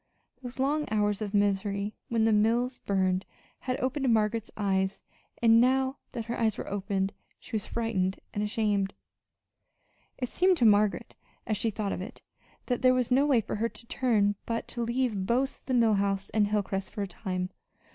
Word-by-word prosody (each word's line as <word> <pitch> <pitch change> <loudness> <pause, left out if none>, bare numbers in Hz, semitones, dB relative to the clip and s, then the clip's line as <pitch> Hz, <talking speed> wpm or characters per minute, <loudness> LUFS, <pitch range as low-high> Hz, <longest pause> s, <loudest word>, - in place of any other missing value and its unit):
Those 245 -1 -7
long 290 +3 +1
hours 210 -1 +1
of 205 -2 -3
misery 200 0 0 0.2
when 230 -1 +2
the 225 - +4
mills 235 +4 +2
burned 190 -1 +1 0.4
had 255 +1 -3
opened 260 0 0
Margaret's 220 0 +1
eyes; 190 -2 0 0.4
and 230 0 +7
now 265 +2 +2 0.2
that 230 -3 -4
her 235 +1 -3
eyes 220 -2 +1
were - - -5
opened, 195 0 -1 0.3
she - - -15
was 215 -1 -1
frightened 195 -5 -1
and 205 - -2
ashamed. 210 -2 0 1.2
It 250 - -2
seemed 370 0 +3
to 240 - +3
Margaret, 210 -1 +3 0.3
as 215 - 0
she 225 - 0
thought 210 -2 -3
of - - -4
it, 225 +7 -9 0.4
that 245 -2 -1
there 255 0 +5
was 250 -1 0
no 275 +3 +4
way 260 -6 +4
for 210 - -4
her 230 +2 0
to 235 - -11
turn 220 -5 +2
but 230 0 -2
to 240 - -3
leave 235 -5 0
both 260 +3 0
the 260 - 0
Mill 230 -3 +4
House 195 -1 0
and 210 -2 +3
Hilcrest 200 -2 -1
for 205 - -4
a - - -3
time. 185 -1 -4
220 Hz, 185 wpm, -29 LUFS, 200-245 Hz, 1.2 s, and